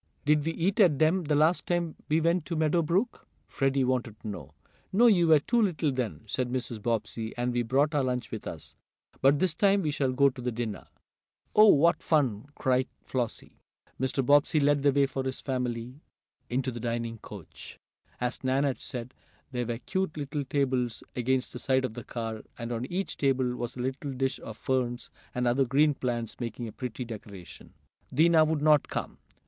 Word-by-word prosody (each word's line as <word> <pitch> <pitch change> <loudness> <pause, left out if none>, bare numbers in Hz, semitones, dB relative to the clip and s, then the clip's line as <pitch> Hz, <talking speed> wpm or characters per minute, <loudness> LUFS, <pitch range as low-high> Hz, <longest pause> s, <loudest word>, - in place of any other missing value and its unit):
"Did 150 0 +3
we 165 +2 -1
eat 190 +7 0
at 175 -9 +5
them 160 +4 +2
the 150 0 +1
last 155 +4 +3
time 175 -2 0
we 155 +2 +3
went 170 +1 +2
to 170 - -3
Meadow 160 +2 +2
Brook?" 185 +10 -1 0.2
Freddie 135 0 +1
wanted 125 -4 -1
to - - -8
know. 90 -9 -8 0.4
"No, 225 +6 +4
you 185 -7 +5
were 155 -2 +7
too 235 - +1
little 170 -7 +1
then," 115 - -3
said 125 -1 -2
Mrs. 125 -3 -3
Bobbsey, 115 0 -2
"and 120 0 -1
we 120 - +1
brought 135 +6 +2
our 145 -2 +2
lunch 125 -4 -2
with - - -6
us. - - -8 0.5
But 135 +2 +5
this 180 +1 +1
time 200 +3 +3
we 150 - 0
shall 140 -3 0
go 140 +1 +4
to 125 -1 -10
the 125 0 -1
diner." 115 -2 -4 0.7
"Oh, 215 +1 +8
what 170 -1 +5
fun!" 135 -7 +1
cried 130 -1 +1 0.2
Flossie. 120 -4 -4 0.4
Mr. 130 0 0
Bobbsey 145 +2 +4
led 145 0 +3
the 140 0 +4
way 140 0 +3
for 135 -1 -3
his 130 0 -3
family 125 0 -3 0.5
into 130 +1 -1
the 120 - -6
dining 115 -1 -3
coach. 100 -6 -11 0.4
As 125 +1 -3
Nan 130 +2 +2
had 140 -3 -1
said, 125 -1 -6 0.4
there 125 -2 -2
were 120 -1 -2
cute 190 +5 -2
little 145 0 -3
tables 130 -4 0
against 130 +1 0
the 125 - -6
side 130 0 +2
of 125 - -5
the 120 - -7
car, 115 -2 -5 0.2
and 115 +1 -5
on 120 +1 -2
each 190 +2 -3
table 130 -3 +1
was 120 0 -5
a 125 - -5
little 135 +2 -3
dish 135 +1 -1
of 110 -1 -9
ferns, 125 -2 -2 0.2
and 125 0 0
other 125 +3 +3
green 145 +4 +3
plants, 120 -4 -3
making 120 0 -4
a - - -7
pretty 125 0 -5
decoration. 105 -5 -10 0.4
Dinah 160 +2 +5
would 155 -1 -1
not 150 -2 +5
come. - - -5
130 Hz, 195 wpm, -28 LUFS, 120-150 Hz, 0.7 s, Oh